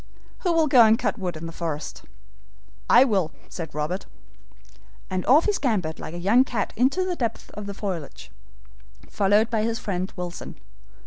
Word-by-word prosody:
Who 360 Hz, -, 0 dB
will 330 Hz, -1 st, +3 dB
go 260 Hz, -5 st, +7 dB
and 220 Hz, 0 st, +5 dB
cut 230 Hz, -, -2 dB
wood 180 Hz, -4 st, -3 dB
in 160 Hz, -, -7 dB
the 165 Hz, -, -6 dB
forest?" 160 Hz, -3 st, -5 dB, 0.9 s
"I -, -, +8 dB
will," 195 Hz, -, +1 dB, 0.2 s
said 160 Hz, -4 st, -7 dB
Robert. 155 Hz, +6 st, -3 dB, 1.0 s
And 185 Hz, -1 st, -1 dB
off 290 Hz, +6 st, +6 dB
he 420 Hz, -, +2 dB
scampered 205 Hz, -, -1 dB
like 165 Hz, -, -7 dB
a -, -, -4 dB
young 205 Hz, +9 st, +4 dB
cat 235 Hz, -6 st, -3 dB
into 275 Hz, -, +2 dB
the 365 Hz, -1 st, -2 dB
depths 230 Hz, -7 st, -3 dB
of 210 Hz, -1 st, -7 dB
the 200 Hz, -, -6 dB
foliage, 185 Hz, -8 st, -6 dB, 0.8 s
followed 205 Hz, +3 st, +2 dB
by 220 Hz, -2 st, +1 dB
his 225 Hz, +1 st, -1 dB
friend 185 Hz, -3 st, -3 dB
Wilson. 175 Hz, -1 st, -6 dB
205 Hz, 175 wpm, -24 LUFS, 175-245 Hz, 1.0 s, I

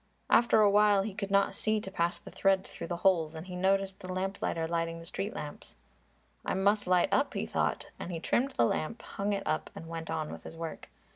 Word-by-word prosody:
After 235 Hz, -2 st, +6 dB
a 210 Hz, -, +7 dB
while 205 Hz, -1 st, +5 dB
he 210 Hz, 0 st, -4 dB
could 200 Hz, 0 st, -4 dB
not 200 Hz, 0 st, +3 dB
see 215 Hz, 0 st, +1 dB
to 190 Hz, -2 st, -7 dB
pass 170 Hz, -2 st, 0 dB
the -, -, -12 dB
thread 195 Hz, -1 st, +2 dB
through -, -, -7 dB
the 175 Hz, -, -3 dB
holes 165 Hz, -4 st, +3 dB
and 160 Hz, +2 st, -7 dB
he 180 Hz, -1 st, -7 dB
noticed 195 Hz, +1 st, +1 dB
the 185 Hz, -, -7 dB
lamplighter 185 Hz, -3 st, -1 dB
lighting 165 Hz, 0 st, -1 dB
the 165 Hz, -, -10 dB
street 195 Hz, +4 st, -4 dB
lamps. 145 Hz, -1 st, -7 dB, 0.7 s
"I -, -, -1 dB
must 200 Hz, +2 st, +2 dB
light 180 Hz, -1 st, +4 dB
up," 280 Hz, 0 st, +2 dB
he -, -, -1 dB
thought. -, -, -1 dB
And 185 Hz, -, -5 dB
he 165 Hz, -, -3 dB
trimmed 260 Hz, +10 st, +1 dB
the 120 Hz, -, +3 dB
lamp, 190 Hz, -, -2 dB
hung 200 Hz, +1 st, -3 dB
it 200 Hz, -1 st, -1 dB
up 155 Hz, -, -1 dB
and 165 Hz, -, -8 dB
went 165 Hz, 0 st, -6 dB
on 160 Hz, -1 st, -2 dB
with -, -, -8 dB
his 165 Hz, -, -10 dB
work. 165 Hz, -1 st, -6 dB
190 Hz, 230 wpm, -31 LUFS, 165-200 Hz, 0.7 s, a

